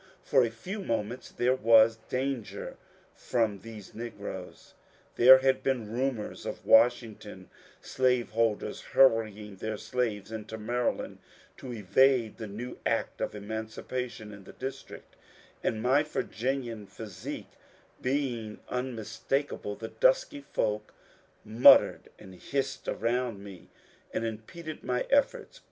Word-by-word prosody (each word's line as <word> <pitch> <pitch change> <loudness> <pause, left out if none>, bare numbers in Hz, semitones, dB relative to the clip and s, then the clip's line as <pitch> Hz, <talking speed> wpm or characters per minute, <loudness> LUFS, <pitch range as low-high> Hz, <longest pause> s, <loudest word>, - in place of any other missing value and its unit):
For 135 -3 +4
a 115 - +1
few 180 - -7
moments 115 - -3
there 125 +1 +1
was 115 -2 +5
danger 130 -3 -3 0.4
from 110 -5 -1
these 110 0 -11
negroes. 100 -5 -8 0.4
There 130 +2 +9
had 130 0 +2
been 120 -6 -1
rumours 125 -3 -2
of - - -6
Washington 110 -4 +3 0.3
slaveholders 120 -4 0
hurrying 110 -5 +2
their 110 +2 -4
slaves 110 -5 -2
into 110 0 -6
Maryland 120 +3 -2 0.4
to 130 - -8
evade 120 +2 +3
the 110 - -6
new 115 +5 -7
Act - - -1
of - - -2
Emancipation 110 +1 -5
in 100 -2 -12
the - - -12
District; 135 +1 -8 0.5
and 110 0 -1
my 130 +4 +4
Virginian 125 -6 -3
physique 100 -4 -8 0.5
being 125 -5 -2
unmistakable, 125 -1 -3
the 110 - -7
dusky - - +2
folk 105 0 -1 0.5
mut 110 +3 +9
tered - - -6 0.2
and 95 -1 -13
hissed 140 -1 -3
around 115 -2 -1
me 95 -4 -11 0.4
and 115 - -2
impeded 135 +9 -7
my 125 -1 0
efforts. 285 - +1
115 Hz, 120 wpm, -29 LUFS, 110-130 Hz, 0.5 s, There